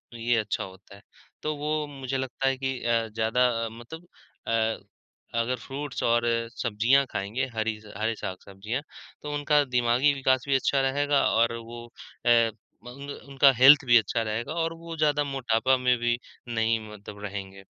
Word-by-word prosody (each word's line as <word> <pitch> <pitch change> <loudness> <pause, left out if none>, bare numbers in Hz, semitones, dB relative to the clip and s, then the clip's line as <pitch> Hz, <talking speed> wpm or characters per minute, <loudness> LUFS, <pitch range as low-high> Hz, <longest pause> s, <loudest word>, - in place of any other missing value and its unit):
ये 120 +1 +1
अच्छा 105 -1 -2
होता 95 +1 -12
है। 100 - -16 0.4
तो 155 0 -1
वो 150 +1 -2
मुझे 135 -2 -4
लगता 130 0 -2
है 135 -1 +1
कि 130 0 -2
अ, 115 -1 +1
ज़्यादा 115 +3 +1 0.2
अ, - - -3
मतलब 140 +10 -11 0.4
अ, - - -1 0.9
अगर 125 +2 0
फ्रूट्स 140 +2 -6
और 120 0 +2 0.3
सब्जियाँ 120 +4 +2
खाएँगे, 105 +7 -2
हरी 110 0 -1
ज़ 105 - -16
हरे 110 +2 -1
साग-सब्जियाँ, 100 +5 -5 0.4
तो 150 0 -5
उनका 145 0 +3
दिमागी 125 +3 +2
विकास 130 -2 +1
भी 140 - +2
अच्छा 135 +1 +2
रहेगा 145 +1 +2
और 115 +1 +3
वो 120 +1 -9 0.4
अ, - - +3 0.6
मंग 140 +3 -9 0.2
उनका 135 0 +5
हेल्थ 135 +3 +8
भी 120 -1 +7
अच्छा 115 +1 0
रहेगा 115 +6 -3
और 165 0 -2
वो 165 0 -8
ज़्यादा 150 -1 +2
मोटापा 130 -2 +1
में 125 -1 +2
भी 120 0 0 0.4
नहीं 110 0 +2
मतलब 105 0 -11
रहेंगे। 95 -1 -7
125 Hz, 165 wpm, -26 LUFS, 110-140 Hz, 0.9 s, हेल्थ